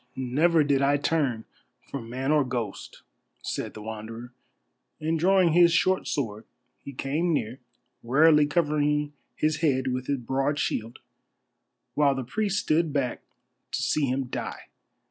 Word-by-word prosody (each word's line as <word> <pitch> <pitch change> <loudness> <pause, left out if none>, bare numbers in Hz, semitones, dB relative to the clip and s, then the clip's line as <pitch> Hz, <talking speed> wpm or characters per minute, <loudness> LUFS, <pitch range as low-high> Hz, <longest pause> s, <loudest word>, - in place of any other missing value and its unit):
"Never 150 +6 +2
did 140 -2 +2
I 140 +1 +3
turn 140 -6 0 0.4
from 120 -5 -7
man 130 +4 -2
or 150 -1 +4
ghost," 120 -6 -5 0.4
said - - -4
the 105 - -8
Wanderer, 110 +3 -7 0.7
and 160 +1 -1
drawing 185 -1 +4
his 170 0 +6
short 185 +3 +2
sword 110 -6 -3 0.3
he 140 - -9
came 145 +6 -1
near, 125 -4 -2 0.4
warily 150 +4 +5
covering 150 -2 +1 0.2
his 155 0 0
head 130 -5 +1
with 130 0 -4
his 140 - 0
broad 135 +4 -1
shield, 115 -4 -2 1.0
while 140 -2 +3
the 135 - -3
priests 205 - -1
stood 160 0 +1
back 140 -4 -1 0.5
to - - -1
see 150 -2 +1
him 130 +2 0
die. 125 - -6
140 Hz, 145 wpm, -26 LUFS, 125-155 Hz, 1.0 s, his